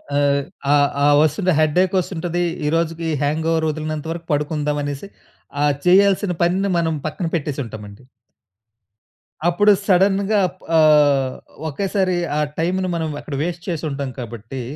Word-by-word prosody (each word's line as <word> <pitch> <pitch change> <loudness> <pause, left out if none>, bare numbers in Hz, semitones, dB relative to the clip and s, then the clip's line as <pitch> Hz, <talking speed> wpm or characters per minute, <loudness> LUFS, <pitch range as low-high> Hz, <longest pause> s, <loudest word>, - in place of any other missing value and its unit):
ఆ! - - +2 0.6
ఆ - - +6 0.3
ఆ - - +5
వస్తుది. 180 +5 +1
హెడ్‌ఏక్ 175 +5 +2
వస్తుంటది. 175 -1 -2 0.2
ఈ - - +2
రోజుకి 165 0 -1 0.2
హ్యాంగోవర్ 160 +2 0
వదిలినంత 155 0 -4
వరకు 170 0 -6
పడుకుందాం 150 0 -1
అనేసి, 145 +5 -5 0.6
ఆ - - +4 0.2
చేయాల్సిన 195 +1 +4
పనిని 190 +3 +1
మనం 165 -1 +1
పక్కన 165 +4 -4
పెట్టేసి 150 -3 -2
ఉంటాం 110 -2 -9
అండి. 100 +6 -15 1.4
అప్పుడు 205 +5 +4
సడెన్‌గా 195 +2 +3
అప్ 180 +1 -14 0.2
ఆహ్, 145 -4 +4 0.4
ఒకేసారి 190 +3 -1 0.2
ఆ - - +1 0.2
టైమ్‌ను 185 +3 0
మనం 160 -1 -2
అక్కడ 145 - -6
వేస్ట్ 175 +1 -4
చేసి 165 -2 -3
ఉంటాం 140 -1 -4
కాబట్టి, 120 +1 -7
165 Hz, 140 wpm, -20 LUFS, 150-180 Hz, 1.4 s, ఆ